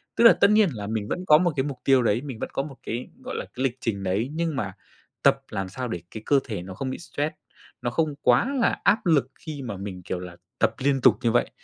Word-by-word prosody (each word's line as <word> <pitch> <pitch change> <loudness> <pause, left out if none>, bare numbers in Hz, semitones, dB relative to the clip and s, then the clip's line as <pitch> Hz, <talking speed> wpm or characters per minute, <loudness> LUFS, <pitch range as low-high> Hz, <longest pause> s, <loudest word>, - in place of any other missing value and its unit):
Tức 235 - +3
là 230 - +10
tất 200 - +4
nhiên 210 -3 +5
là 105 -2 -5
mình 110 -1 -2
vẫn 180 - -3
có 150 -3 +7
một 175 -1 +1
cái 130 - +1
mục 140 -2 -5
tiêu 135 -2 +4
đấy, 115 +1 +2
mình 135 -6 -7
vẫn - - -3
có 135 - 0
một 140 -2 -9
cái, 120 +2 -4 0.2
gọi - - -5
là, - - -3
cái 130 - -3
lịch 130 -2 0
trình 100 -4 -2
đấy, 100 +7 0
nhưng 165 -2 -1
mà 100 -7 -3 0.5
tập - - +4
làm 95 -1 -3
sao 125 +4 -4
để 90 -6 -4
cái 110 -1 -8
cơ 140 - +4
thể 105 -8 -5
nó 95 +1 -8
không 130 +7 -4
bị 130 - -4
stress, 150 -2 -3 0.5
nó 120 - -1
không 150 +4 0
quá 125 - +3
là 230 - +2
áp 210 - +3
lực 140 -6 +3
khi 150 -3 -7
mà 115 -6 -5
mình, 95 -2 -6
kiểu 90 - -3
là, 90 -1 -8 0.2
tập - - +3
liên 135 0 +1
tục - - +6
như 115 - +3
vậy, 120 - +2
130 Hz, 275 wpm, -25 LUFS, 105-150 Hz, 0.5 s, là